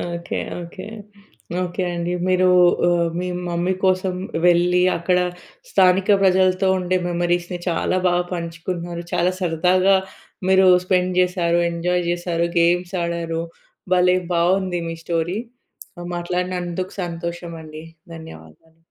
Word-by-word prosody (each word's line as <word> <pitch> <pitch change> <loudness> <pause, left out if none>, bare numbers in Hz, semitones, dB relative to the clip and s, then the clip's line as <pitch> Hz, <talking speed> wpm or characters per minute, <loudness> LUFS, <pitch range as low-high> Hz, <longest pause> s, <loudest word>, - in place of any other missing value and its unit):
Okay. 170 0 -4 0.2
Okay. 170 +3 -9 0.8
Okay 180 +1 -3
అండి. 170 +1 -2
మీరూ 185 0 +3 0.4
ఆహ్, 170 -1 +2
మీ 180 - -3 0.2
మమ్మీ 175 +2 0
కోసం 185 0 +1 0.3
వెళ్లి, 180 +1 +4 0.2
అక్కడ 180 +2 +1 0.5
స్థానిక 190 - +3
ప్రజలతో 185 0 +3
ఉండే 185 0 0
మెమరీస్‌ని 175 0 -1
చాలా 175 +2 0
బాగా 175 0 +1
పంచుకున్నారు. 170 0 -5
చాలా 175 +1 +2
సరదాగా 185 +2 +3 0.5
మీరు 190 0 +5 0.2
స్పెండ్ 185 0 +1
చేశారు. 175 -2 +1
ఎంజాయ్ 175 +1 -1
చేశారు. 175 -1 -1
గేమ్స్ 175 +1 +2
ఆడారు. 170 -1 -2 0.5
భలే 180 0 +4 0.2
బాగుంది 180 +1 +1
మీ 165 - -4
స్టోరీ. 170 +3 -1 0.8
మాట్లాడినందుకు 180 +1 -3
సంతోషమండి. 170 -2 -6 0.3
ధన్యవాదాలు. 160 - -13
175 Hz, 110 wpm, -21 LUFS, 170-185 Hz, 0.8 s, మీరు